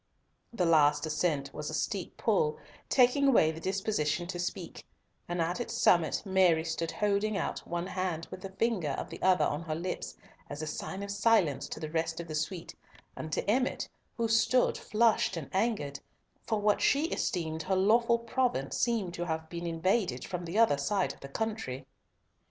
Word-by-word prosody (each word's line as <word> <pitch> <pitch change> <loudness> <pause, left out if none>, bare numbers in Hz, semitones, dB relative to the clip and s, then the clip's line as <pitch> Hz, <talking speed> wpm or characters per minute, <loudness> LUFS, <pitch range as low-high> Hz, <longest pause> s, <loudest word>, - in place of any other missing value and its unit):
The 195 -7 0
last 150 -2 +4
ascent 150 -3 -1
was 150 - -5
a - - -3
steep - - -3
pull, 460 -1 +1 0.3
taking 260 +2 +4
away 195 -12 +5
the 160 - -8
disposition 180 -4 -1
to 175 - -4
speak, 175 -1 -4 0.5
and 175 0 -2
at 170 +5 0
its 240 - -4
summit 170 -4 +3
Mary 185 -4 +4
stood 165 0 -2
still - - -9
holding 205 +1 +1
out 180 - -2
one 175 0 -2
hand, 185 -3 -3
with 185 0 -8
a 195 - -5
finger 190 -6 0
of - - -5
the - - -8
other 185 -1 +4
on 145 +2 -1
her 160 -2 -3
lips 155 - -4 0.3
as 145 - -5
a - - -2
sign 190 +5 -5
of 200 - -5
silence 200 - +2
to - - -6
the 155 -1 -5
rest 165 0 -1
of 170 - -6
the 155 - -6
suite 160 +3 -3 0.4
and 155 - -6
to - - -2
Emmott, 250 +5 +1 0.3
who 230 -1 +1
stood 225 +3 +3
flushed 220 -4 +2
and 155 -5 -6
angered; 190 -9 0 0.5
for 220 - +1
what 205 0 +2
she 285 +3 +3
esteemed 160 - -2
her 190 +4 0
lawful 235 +5 +4
province 235 - -1
seemed 220 -7 0
to 175 0 -4
have 160 -1 -3
been 170 0 -5
invaded 185 +5 0
from 180 -2 -4
the 170 +5 -3
other 225 -11 +4
side 200 +8 0
of - - -19
the 140 - -9
country. 215 - -3
180 Hz, 190 wpm, -30 LUFS, 160-215 Hz, 0.5 s, away